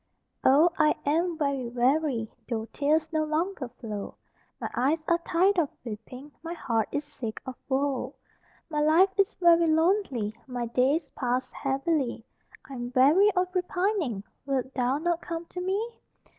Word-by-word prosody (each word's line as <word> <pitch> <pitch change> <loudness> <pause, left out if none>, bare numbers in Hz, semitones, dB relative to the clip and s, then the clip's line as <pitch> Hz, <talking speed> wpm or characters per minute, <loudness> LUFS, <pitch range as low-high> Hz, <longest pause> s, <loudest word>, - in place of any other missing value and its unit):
Oh, 300 +6 +6
I 305 -1 +4
am 330 +3 +1
very 280 -5 -1
weary, 250 -1 +1 0.2
Though 220 -2 -2
tears 310 +3 +1
no 310 0 +2
longer 310 -1 -1
flow; 210 -4 -6 0.4
My - - -3
eyes 310 +6 +1
are 340 0 +3
tired 360 +3 +2
of 305 -5 +1 0.2
weeping, 250 +6 -8
My 330 +1 -5
heart 225 -8 -1
is 290 - -1
sick 250 -6 -6
of 260 - -5 0.2
woe; 270 0 -1 0.5
My 300 -3 -1
life 330 +6 +5
is 395 +3 +3
very 340 -1 +5
lonely 320 - +1
My 245 -2 -3
days 265 +7 +1
pass 250 0 -2
heavily, 270 -3 -1 0.4
I'm 245 -3 -6
weary 305 +11 +6
of 365 0 0
repining; 360 - -1 0.2
Wilt 265 -1 -1
thou 255 +1 +1
not 340 +2 -1
come 335 0 -5
to 360 - -7
me? 410 +6 -2
295 Hz, 150 wpm, -27 LUFS, 255-340 Hz, 0.5 s, Oh